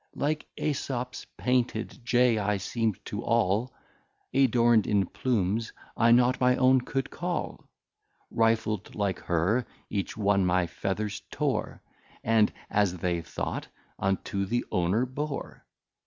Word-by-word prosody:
Like 150 +2 -1
Esops 125 -4 -3
Painted 125 -1 -1
Jay 120 -1 +3
I 105 0 +1
seem'd 110 +1 -1
to - - -4
all, 105 +7 +1 0.6
Adorn'd 120 -4 +4
in 100 -2 +2
Plumes, 105 +1 -1 0.2
I 115 0 +4
not 125 +2 +4
my 125 0 +5
own 130 0 +4
could 135 +2 -3
call: 175 0 -4 0.7
Rifl'd 115 -3 +1
like 100 -3 -1
her, 90 +9 +1 0.3
each 100 0 -2
one 100 -2 +3
my 90 0 +2
Feathers 100 +4 -3
tore, - - -2 0.4
And, 110 -1 +4 0.2
as 100 -3 +2
they 85 0 -1
thought, 85 - -4 0.3
unto 95 0 -1
the 120 +4 0
Owner 90 +7 +2
bore. 140 +3 -5
110 Hz, 125 wpm, -28 LUFS, 100-125 Hz, 0.7 s, my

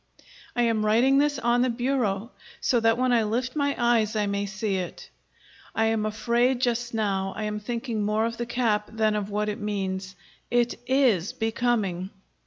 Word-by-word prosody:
I 240 - +2
am 225 -2 +1
writing 240 +6 +4
this 290 0 +2
on 240 -1 +2
the 255 - +2
bureau, 235 -3 -1 0.3
so 245 - +2
that 225 0 +3
when 255 0 +2
I 235 - +4
lift 240 +5 -2
my 285 -1 +1
eyes 235 -3 +2
I 210 -1 +1
may 200 0 -1
see 195 0 -2
It. 180 -2 -6 0.6
I 225 - +2
am 220 -1 +1
afraid 240 +4 +1
just 240 -1 -1
now 195 -3 -1
I 215 - -3
am 210 0 -2
thinking 230 0 -3
more 210 +2 +1
of 230 0 -3
the 240 - -3
cap 225 -4 0
than 220 -1 +1
of 205 -1 -2
what 210 +1 -1
it 210 +2 -3
means. 195 -2 -3 0.3
It 240 0 +2 0.2
IS 245 -10 +3
becoming! 220 -5 -1
225 Hz, 185 wpm, -26 LUFS, 210-240 Hz, 0.6 s, writing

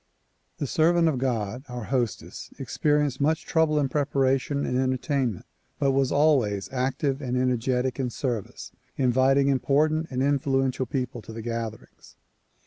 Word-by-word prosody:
The - - -2
servant 165 +4 +3
of 145 -6 0
God, 120 -2 -2
our 125 -1 -5
hostess, 120 0 -3
experienced 145 -3 0
much 155 +2 +1
trouble 160 -2 +2
in 145 -2 +2
preparation 140 0 0
and - - -2
entertain 130 -1 0
ment 90 - -12 0.3
but 140 - +2
was 135 -1 +1
always 125 -10 +2
active 135 +2 -1
and 125 -2 -2
energetic 125 +1 0
in 130 -2 0
service, 120 -4 -4 0.3
inviting 130 +2 +3
important 150 +4 +2
and 130 0 -1
influential 135 -2 +1
people 125 -1 -3
to 105 - -11
the 110 0 -7
gatherings. 115 -2 -6
130 Hz, 140 wpm, -26 LUFS, 125-140 Hz, 0.3 s, servant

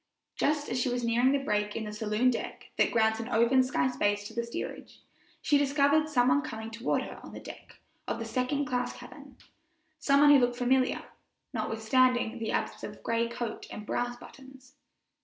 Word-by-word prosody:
Just 295 0 0
as 250 +1 -1
she 255 - +1
was 245 0 -2
nearing 235 +3 +3
the 280 - +3
break 210 -6 -1
in 225 - -3
the 210 -1 -6
saloon 215 +4 +1
deck 235 - -6
that - - +3
grants 220 -1 +2
an 225 +2 -5
open 240 +3 +4
sky 260 +2 +1
space 205 -5 0
to 225 - -12
the 235 +1 -1
steerage, 235 - -7 0.4
she 290 - +3
discovered 285 +2 +3
some 250 -4 +3
one 275 +3 +3
coming 220 -6 -6
toward 230 +2 -1
her - - -9
on - - -11
the - - -7
deck - - -11 0.3
of - - -2
the - - -5
second 275 +3 -1
class 250 -1 -2
cabin - - -13 0.6
some 280 0 +3
one 290 0 +8
who 285 - +8
looked 245 -1 +1
familiar, 255 +1 +1 0.5
notwithstanding 245 +1 +1
the 225 -1 -3
absence - - -2
of - - -8
gray 230 0 0
coat 235 -1 -5
and 210 - -8
brass 245 +2 -2
buttons. 265 0 -15
245 Hz, 195 wpm, -29 LUFS, 225-270 Hz, 0.6 s, one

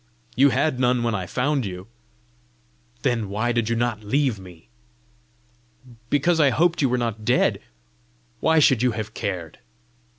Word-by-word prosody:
"You 140 +2 +5
had 140 -1 0
none 125 -1 +2
when 115 -1 0
I 95 -4 -3
found 135 - 0
you." 90 -2 -6 1.2
"Then 120 -6 0
why 110 +4 -1
did 115 -2 -1
you 115 - 0
not 115 -2 -2
leave 130 0 0
me?" 90 -3 -14 1.4
"Because 160 +4 +2
I 145 -3 +5
hoped 170 +6 +1
you 135 - +2
were 125 - +1
not 115 -3 -3
dead." - - +2 0.8
"Why 160 0 +2
should 130 -6 +4
you 125 -2 +2
have 110 0 -5
cared?" 90 -8 -5
120 Hz, 155 wpm, -23 LUFS, 105-135 Hz, 1.4 s, You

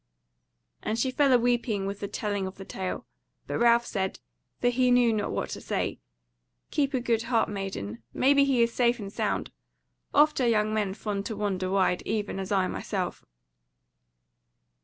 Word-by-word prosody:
And 220 - -2
she 255 +3 +1
fell 280 +1 +3
a 250 - +7
weeping 235 -4 +1
with 200 +1 -4
the 200 - -3
telling 205 -2 -2
of 190 - -8
the 195 - -9
tale. 190 -1 -4 0.4
But - - -3
Ralph 235 0 +5
said 190 -4 -2 0.4
(for 245 - +3
he 250 +1 +2
knew 245 -2 +5
not 215 - -1
what - - -3
to - - -5
say): - - -2 0.7
"Keep 280 -2 +1
a - - +2
good 235 -2 +1
heart, 230 -3 +2
maiden; 155 - -5
maybe 280 +2 +4
he 265 -4 +3
is 230 0 0
safe 240 -1 +3
and 200 -3 -7
sound; - - -1 0.6
oft 300 -1 +4
are 245 - +3
young 215 -2 +2
men 205 -3 0
fond 205 -2 -3
to 220 - -4
wander 190 -3 -1
wide, 190 -2 +2
even 210 -2 -2
as 190 +1 -5
I 190 -2 +3
myself." - - -3
215 Hz, 180 wpm, -28 LUFS, 195-245 Hz, 0.7 s, a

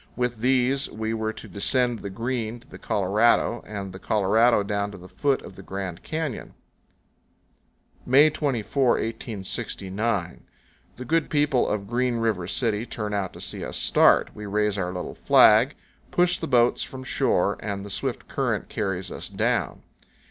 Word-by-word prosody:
With 125 -1 -1
these 130 +3 +2
we 110 +1 -3
were 110 -1 -1
to - - -10
descend 120 +3 0
the 100 - -6
Green 115 +2 -3
to 115 - -21
the - - -12
Colorado, 105 +4 +2
and 100 -3 -6
the 95 - -9
Colorado 110 +3 +3
down 100 0 -1
to 100 - -10
the 90 0 -12
foot 140 +6 0
of 95 - -11
the - - -10
Grand 95 -2 -5
Canyon. 155 -6 -4 1.5
May 145 +5 +5
24, 135 -3 +1
1869. 105 -3 -3 0.6
The 125 - -7
good 165 +4 +1
people 145 -4 +2
of 105 -1 -2
Green 125 +1 0
River 110 -6 -1
City 110 0 0
turn 105 -3 -4
out 100 -3 -1
to - - -11
see - - -4
us - - -4
start. - - +4
We 105 -1 -8
raise 105 0 +1
our 90 -3 -2
little 90 -1 -5
flag, - - +5 0.3
push 180 0 +2
the 165 - -3
boats 120 -3 +3
from 130 -1 -6
shore, 100 -7 +1
and 100 -2 -4
the 100 - -8
swift 125 +5 -3
current 120 -6 -2
carries 95 -4 -3
us - - -6
down. - - -1
110 Hz, 165 wpm, -25 LUFS, 100-125 Hz, 1.5 s, May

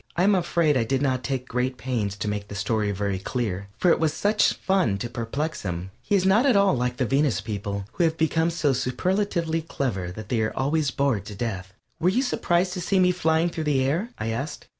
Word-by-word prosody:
I 175 - +3
am 205 +2 +5
afraid 170 -5 +2
I 120 - +2
did 135 +4 0
not 130 -2 0
take 130 -2 -3
great 125 +1 -1
pains 115 -7 -2
to 105 - -4
make 105 0 -3
the 105 - -8
story 105 0 0
very 100 -1 -2
clear, 100 -2 -3
for 180 - +3
it - - +3
was 160 -1 +2
such 210 +4 +2
fun 185 - +1
to 110 - -4
perplex 130 +7 -3
him. 90 0 -4
He 125 - 0
is 190 -1 +2
not 215 +8 +4
at 255 - +4
all 200 -1 +4
like 125 0 -1
the 130 - +1
Venus 135 0 +2
people, 100 -1 -4
who 175 - 0
have 165 -1 +1
become 160 +1 +2
so 155 -4 +1
superlatively 170 +5 0
clever 115 - -3
that 105 +3 -9
they 115 -2 +1
are 110 - -2
always 145 +2 +1
bored 130 -8 0
to 105 - -8
death. 100 -4 -4 0.3
"Were 175 - +3
you 245 +8 +1
surprised 180 -7 +1
to 180 - -4
see 195 +3 +1
me 180 -1 +5
flying 165 -1 +1
through 160 -2 -4
the 140 -3 +2
air?" 165 - 0
I 110 - -3
asked. 135 +7 -4
135 Hz, 230 wpm, -25 LUFS, 110-170 Hz, 0.3 s, am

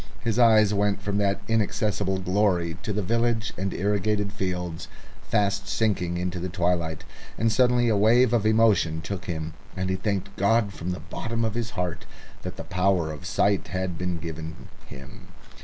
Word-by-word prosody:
His 115 0 0
eyes 110 -3 +6
went 100 0 +1
from 100 0 -2
that 100 -1 +1
inaccessible 105 -3 0
glory 90 -3 +1
to - - -3
the 105 0 -1
village 115 +2 0
and 95 +1 -2
irrigated 105 +1 0
fields, 90 -4 -3 0.3
fast 100 -2 0
sinking 90 -6 0
into 90 0 -2
the 90 +2 -3
twilight, 85 -3 -1 0.3
and 115 0 +2
suddenly 125 +1 +3
a 110 - +3
wave 115 +4 +4
of 115 -4 +3
emotion 110 -8 +3
took 90 +3 -5
him, 80 -2 -4 0.2
and 95 0 -1
he - - +1
thanked 100 0 -2
God 100 0 +2
from 85 0 -5
the 90 - -3
bottom 115 0 -3
of 110 - -1
his 115 -1 -2
heart 85 -2 -3 0.3
that 90 0 -6
the 95 - -5
power 90 -3 +1
of 75 -3 -7
sight 100 -2 +1
had 90 -1 -3
been 90 -1 -1
given 80 0 -7 0.2
him. 65 0 -12
100 Hz, 175 wpm, -26 LUFS, 90-110 Hz, 0.3 s, eyes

